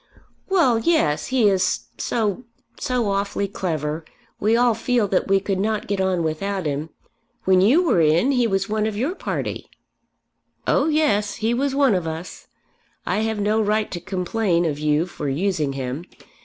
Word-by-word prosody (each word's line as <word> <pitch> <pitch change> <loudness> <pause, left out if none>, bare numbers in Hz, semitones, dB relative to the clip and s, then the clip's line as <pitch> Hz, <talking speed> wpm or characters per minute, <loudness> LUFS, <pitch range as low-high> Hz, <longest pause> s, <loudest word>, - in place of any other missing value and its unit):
"Well, 275 -12 +3
yes; 225 - +1
he 255 -5 +3
is 190 -2 +1 0.2
so, 220 0 -1 0.3
so 245 -5 0
awfully 200 0 -1
clever! 160 -5 -3 0.4
We 220 +3 +3
all 240 -1 +4
feel 230 -1 0
that 190 - +1
we 195 0 +4
could 195 -1 -2
not 215 +1 -1
get 200 -1 -1
on 185 -2 +1
without 185 +4 -2
him. 150 +2 -2 0.5
When 185 -1 +4
you 265 - +5
were 245 - +3
in, 165 - +3
he 250 -3 +2
was 195 -2 0
one 215 0 0
of 210 -2 -4
your 270 +10 0
party." - - -4 1.0
"Oh 280 - +2
yes; 255 -10 +1
he 225 +2 0
was 270 +2 0
one 275 -5 +4
of 180 -3 -1
us. 160 +3 -7 0.6
I - - 0
have 220 -1 -1
no 210 +2 +2
right 215 0 0
to 175 - -4
complain 180 0 0
of 150 -3 -2
you 150 +2 +1
for 155 -5 -5
using 155 -1 0
him. 135 +4 -4
200 Hz, 170 wpm, -22 LUFS, 170-225 Hz, 1.0 s, you